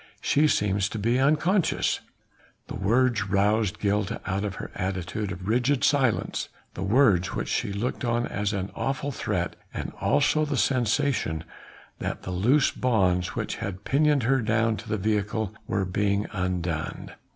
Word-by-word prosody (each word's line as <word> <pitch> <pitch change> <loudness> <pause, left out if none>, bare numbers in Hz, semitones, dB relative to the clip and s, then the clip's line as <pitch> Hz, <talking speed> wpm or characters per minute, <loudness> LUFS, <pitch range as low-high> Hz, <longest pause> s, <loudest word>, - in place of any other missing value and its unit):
She 150 +2 +3
seems 100 -6 +1
to - - -5
be 115 +4 +1
unconscious." 155 +7 +2 0.7
The - - -5
words 110 0 +2
roused 105 +1 +2
Gilda 105 +1 0
out 95 +1 -1
of 100 -3 -3
her - - -7
attitude 95 +2 -3
of 90 +1 -7
rigid 125 +4 +2
silence, 135 -6 +1 0.2
the - - -7
words 100 -4 +3
which - - -3
she - - -1
looked 110 +7 -3
on 120 0 +1
as 105 -2 -2
an 100 -2 -3
awful 135 +1 -2
threat, 90 -8 -2 0.2
and - - -4
also 145 +2 +3
the 145 -3 -1
sensation 125 - +1 0.6
that - - -4
the 95 - -5
loose 120 +11 +3
bonds 95 -8 +1
which - - -3
had 95 0 -5
pinioned 145 0 +2
her 135 +3 +2
down 115 0 +1
to 115 - -9
the 110 - 0
vehicle 105 +1 -1
were 95 -1 0
being 100 +2 0
undone. 90 -4 -3
105 Hz, 155 wpm, -26 LUFS, 95-130 Hz, 0.7 s, She